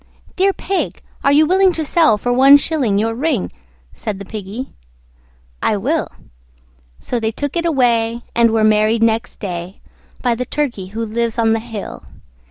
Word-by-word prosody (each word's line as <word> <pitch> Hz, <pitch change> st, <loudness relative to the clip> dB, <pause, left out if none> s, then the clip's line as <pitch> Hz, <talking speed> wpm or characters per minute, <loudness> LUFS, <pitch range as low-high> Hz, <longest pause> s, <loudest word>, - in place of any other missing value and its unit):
"Dear 390 Hz, +1 st, +3 dB
Pig, 390 Hz, 0 st, -3 dB, 0.2 s
are 280 Hz, -, +4 dB
you 300 Hz, +2 st, +5 dB
willing 375 Hz, +3 st, +4 dB
to 320 Hz, -2 st, -3 dB
sell 310 Hz, -7 st, +3 dB
for 245 Hz, +4 st, -1 dB
one 270 Hz, +3 st, +8 dB
shilling 280 Hz, -9 st, 0 dB
Your 225 Hz, +2 st, 0 dB
ring?" 260 Hz, -, -1 dB, 0.4 s
Said 210 Hz, -3 st, -5 dB
the 200 Hz, -, -8 dB
Piggy, 215 Hz, +5 st, -7 dB, 0.9 s
"I -, -, +1 dB
will." -, -, -1 dB, 0.9 s
So 245 Hz, -, -2 dB
they 220 Hz, -1 st, -1 dB
took 285 Hz, +6 st, -4 dB
it 340 Hz, 0 st, 0 dB
away, 235 Hz, -5 st, +1 dB
and 235 Hz, 0 st, +4 dB
were 220 Hz, -1 st, +1 dB
married 215 Hz, +1 st, +3 dB
next 230 Hz, +1 st, 0 dB
day 180 Hz, -1 st, -6 dB, 0.4 s
By 245 Hz, -2 st, +2 dB
the 240 Hz, +2 st, -2 dB
Turkey 250 Hz, -9 st, -3 dB
who 225 Hz, +4 st, -4 dB
lives 230 Hz, +1 st, -2 dB
on 225 Hz, -1 st, +3 dB
the 225 Hz, -, 0 dB
hill. 225 Hz, -3 st, -8 dB
230 Hz, 170 wpm, -18 LUFS, 220-285 Hz, 0.9 s, one